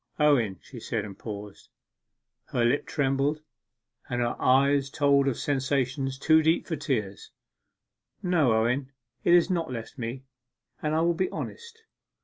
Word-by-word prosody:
'Owen,' 125 - +3
she 125 - -10
said, 110 -1 -3
and 100 -1 -10
paused. 105 -2 -8 0.8
Her 120 - 0
lip 125 +5 +1
trembled; 140 +2 0 0.7
her 120 -1 -1
eye 140 +2 +4
told 140 -1 +3
of 135 - 0
sensations 135 -1 -1
too 160 +3 +4
deep 160 +2 +2
for 165 - -3
tears. 105 -10 -3 0.9
'No, 170 -9 +3
Owen, 125 +5 +1 0.3
it 175 - +5
has 175 +2 +4
not 170 -4 -1
left 115 +2 -7
me; 120 +3 -5 0.6
and 155 0 0
I 160 - +2
will 170 +1 +3
be 185 +3 -1
honest. 460 -1 -8
135 Hz, 140 wpm, -27 LUFS, 120-155 Hz, 0.9 s, it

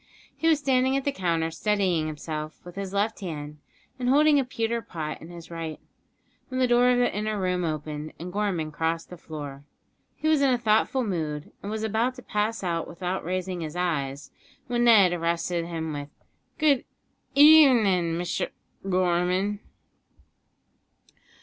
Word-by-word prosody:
He 325 - -1
was 320 -2 +5
standing 265 -1 +2
at 275 - -2
the 285 - 0
counter 165 -8 -1
steadying 185 -5 +1
himself 155 0 -5
with 175 - -10
his 195 -1 -4
left 205 +3 0
hand 150 -5 -6 0.4
and 250 0 0
holding 295 +2 +5
a - - +2
pewter 230 -1 -2
pot 155 -7 -6
in 160 - -10
his 170 -1 -11
right, 165 -2 -5 0.7
when 255 0 -3
the 255 - +4
door 245 0 +4
of 250 - +4
the 245 -4 +1
inner 210 0 -1
room 180 -1 0
opened, 155 -1 -4
and 180 +2 -7
Gorman 190 -7 -1
crossed 165 +2 -2
the 180 - -8
floor. 145 -4 -8 0.5
He 310 - -3
was 310 -2 +4
in 275 -2 +4
a 250 - +3
thoughtful 235 +3 +2
mood, 155 -8 -3
and 200 - -6
was 220 0 -3
about 225 +4 0
to 250 - -11
pass 210 +1 -1
out 170 -2 -1
without 180 +2 -4
raising 185 0 -3
his 155 0 -5
eyes, 145 -6 -2 0.3
when 240 0 +1
Ned 200 -6 +6
arrested 170 0 -1
him 160 -2 -4
with: 145 0 -6 0.5
"Good 290 -4 +3 0.5
ev 300 0 +9
n'in', 180 -7 +1
Misher 175 0 -2 0.4
Gorm'n." 185 +2 +1
185 Hz, 165 wpm, -26 LUFS, 165-235 Hz, 0.7 s, ev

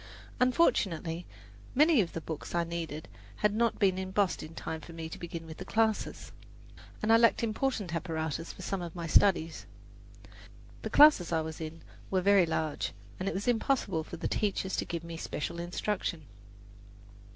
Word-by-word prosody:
Unfortunately, 180 - +2 0.5
many 300 -2 +6
of 175 - -3
the 165 - -4
books 160 +1 -6
I 170 - +2
needed 165 -2 -5 0.3
had 210 -1 +1
not 230 +1 +1
been 190 -2 +2
embossed 190 0 0
in 155 +1 -9
time 160 0 -5
for 165 - -11
me 165 -1 -5
to 160 - -8
begin 165 -1 -6
with 160 -1 -9
the - - -6
classes, 220 -1 0 0.7
and 220 +1 +4
I - - +8
lacked 230 +1 +4
important 220 -5 -1
apparatus 165 -2 -3
for 185 - -10
some 190 +1 -2
of 170 -1 -6
my 170 -1 -4
studies. 165 -1 +3 1.1
The - - -4
classes 290 - +7
I 165 -1 +2
was 160 +1 -6
in 160 +1 -7 0.3
were 190 - +2
very 195 -2 +5
large, 160 -2 -1 0.3
and 190 +1 -1
it - - -4
was 200 +4 -3
impossible 225 -8 +1
for 170 - -8
the - - -2
teachers 195 -2 -1
to - - 0
give 170 -1 -4
me 170 0 -7
special 165 +1 -4
instruction. 175 -1 -2
175 Hz, 175 wpm, -30 LUFS, 165-210 Hz, 1.1 s, I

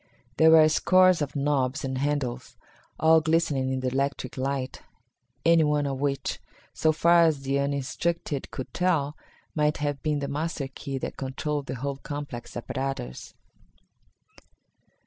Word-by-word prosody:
There 160 - +6
were 160 -1 +8
scores 185 +2 +4
of 145 0 -3
knobs 140 -1 0
and 130 -1 -3
handles, 140 -3 -2 0.4
all 160 0 +5
glistening 155 -5 +1
in 130 0 -2
the 130 - 0
electric 135 -1 -2
light, 135 0 -3 0.6
any 165 -1 +6
one 150 -1 +1
of 135 -1 -3
which, 140 -2 -1 0.3
so 155 - +2
far 170 +2 +5
as 155 -4 +1
the 135 +1 0
uninstructed 140 +2 -2
could 130 - -7
tell, 160 -5 +1 0.4
might 150 -1 +1
have 145 -1 -2
been 150 -1 0
the 140 -1 -3
master 150 0 -3
key 135 0 -6
that - - -5
controlled 140 +2 -3
the - - -4
whole 140 +2 -3
complex 145 -5 -7
apparatus. 125 - -5
140 Hz, 145 wpm, -26 LUFS, 135-155 Hz, 0.6 s, were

